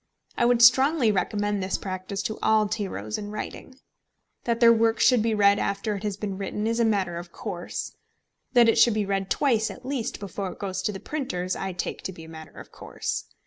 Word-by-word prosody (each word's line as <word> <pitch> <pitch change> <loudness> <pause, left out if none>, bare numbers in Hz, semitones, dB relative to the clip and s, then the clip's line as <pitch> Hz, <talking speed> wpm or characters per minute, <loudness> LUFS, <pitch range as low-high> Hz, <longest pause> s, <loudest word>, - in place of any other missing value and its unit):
I 240 - +2
would 240 -1 +4
strongly 265 0 +5
recommend 205 +1 -1
this 185 0 -1
practice 185 +1 -5
to 220 - -4
all 215 -1 +3
tyros 190 - -4
in 205 - -6
writing. 215 +4 -7 0.7
That 235 -1 0
their 230 -1 +7
work 225 0 +2
should 250 -3 +5
be 225 0 +1
read 200 -1 +4
after 200 +2 -1
it 200 - -6
has 205 -2 -3
been 200 -2 -4
written 210 +2 -3
is 230 +1 0
a 235 - +4
matter 195 -6 0
of 175 0 -8
course, 180 -4 -6 0.6
that 240 -2 +6
it 225 - +3
should 235 -3 +5
be 210 -1 0
read 195 -1 -2
twice 230 -7 +2
at 255 - -10
least 260 -4 -3
before 195 -1 -5
it - - -18
goes 190 -2 -3
to 210 - -1
the 195 - -7
printers, 185 -12 -3
I 190 -1 -4
take 175 - -4
to - - -5
be 165 - -11
a 160 - -12
matter 160 -1 -11
of - - -12
course. - - -5
205 Hz, 220 wpm, -25 LUFS, 190-230 Hz, 0.7 s, their